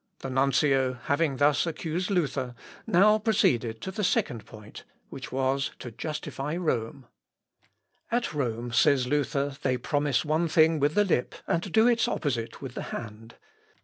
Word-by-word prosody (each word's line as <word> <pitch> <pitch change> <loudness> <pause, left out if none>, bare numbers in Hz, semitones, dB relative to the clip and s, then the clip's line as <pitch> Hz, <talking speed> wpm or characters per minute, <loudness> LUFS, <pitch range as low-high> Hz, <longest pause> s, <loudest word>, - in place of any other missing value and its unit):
The 135 - -5
nuncio, 135 0 +2
having 140 +3 -1
thus 145 +4 +3
accused 165 +3 -3
Luther, 140 -9 -1 0.3
now 210 +2 +5
proceeded 120 - +1
to 190 - -4
the 210 +2 -3
second 120 - 0
point, 105 -1 -12 0.3
which 135 - -8
was 135 +1 0
to 120 - -8
justify 150 +2 -4
Rome. 135 -7 -2 1.1
"At 240 -6 0
Rome," 120 -4 -2
says 125 +2 +3
Luther, 140 0 -1
"they 130 -2 +1
promise 145 0 0
one 155 +3 +1
thing 160 0 +4
with 145 +2 +1
the 205 - +4
lip 155 -10 0
and 170 +3 -1
do 220 +4 +5
its 235 -2 +3
opposite 120 -4 -3
with 130 -2 -6
the - - -5
hand. 115 0 -8
140 Hz, 150 wpm, -27 LUFS, 125-165 Hz, 1.1 s, now